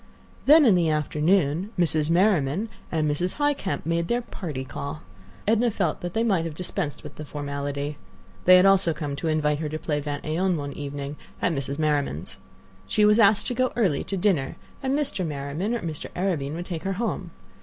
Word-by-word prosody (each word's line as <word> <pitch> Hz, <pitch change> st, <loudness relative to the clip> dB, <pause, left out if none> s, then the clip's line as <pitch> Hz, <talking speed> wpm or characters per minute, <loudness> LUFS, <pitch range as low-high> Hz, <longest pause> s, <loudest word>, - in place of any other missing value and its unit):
Then 305 Hz, +1 st, +8 dB
in 225 Hz, -, +6 dB
the 175 Hz, -3 st, +3 dB
afternoon 155 Hz, +3 st, +1 dB
Mrs. 160 Hz, -3 st, +2 dB
Merriman 180 Hz, +1 st, +2 dB, 0.2 s
and 155 Hz, -2 st, +1 dB
Mrs. 160 Hz, +5 st, 0 dB
Highcamp 290 Hz, -9 st, 0 dB
had -, -, -25 dB
made 165 Hz, +1 st, 0 dB
their 240 Hz, +3 st, 0 dB
"party 150 Hz, -, -6 dB
call." 140 Hz, +3 st, -6 dB, 0.4 s
Edna 230 Hz, +2 st, +3 dB
felt 190 Hz, -7 st, -1 dB
that 175 Hz, 0 st, -5 dB
they 225 Hz, -, +2 dB
might 195 Hz, -8 st, +2 dB
have 165 Hz, -2 st, -5 dB
dispensed 180 Hz, -3 st, -3 dB
with 150 Hz, -, -10 dB
the 155 Hz, -, -6 dB
formality. 145 Hz, 0 st, -4 dB, 0.5 s
They 185 Hz, -, +9 dB
had 185 Hz, +1 st, +6 dB
also 190 Hz, -4 st, +4 dB
come 145 Hz, -3 st, -4 dB
to 165 Hz, -, -3 dB
invite 150 Hz, -2 st, +1 dB
her 155 Hz, -1 st, -2 dB
to 155 Hz, -, -3 dB
play 150 Hz, -2 st, -2 dB
vingt 145 Hz, 0 st, -4 dB
et 155 Hz, +1 st, -2 dB
un 185 Hz, -2 st, +2 dB
one 145 Hz, -1 st, -4 dB
evening 140 Hz, 0 st, -5 dB, 0.2 s
at 175 Hz, -, +1 dB
Mrs. 140 Hz, -1 st, -3 dB
Merriman's. 145 Hz, -, -1 dB, 0.5 s
She 210 Hz, -, +3 dB
was 210 Hz, +2 st, +5 dB
asked 205 Hz, -1 st, +5 dB
to 250 Hz, -, 0 dB
go 255 Hz, +1 st, +1 dB
early, 190 Hz, -12 st, +1 dB
to 195 Hz, -, -2 dB
dinner, 175 Hz, -8 st, +1 dB, 0.3 s
and 270 Hz, +1 st, 0 dB
Mr. 275 Hz, -10 st, 0 dB
Merriman 150 Hz, +8 st, -2 dB
or 235 Hz, -, -3 dB
Mr. 160 Hz, -3 st, -4 dB
Arobin 160 Hz, -6 st, -1 dB
would 175 Hz, +1 st, -5 dB
take 170 Hz, -3 st, -4 dB
her 195 Hz, -, -2 dB
home. 195 Hz, -3 st, -3 dB
165 Hz, 200 wpm, -25 LUFS, 145-195 Hz, 0.5 s, They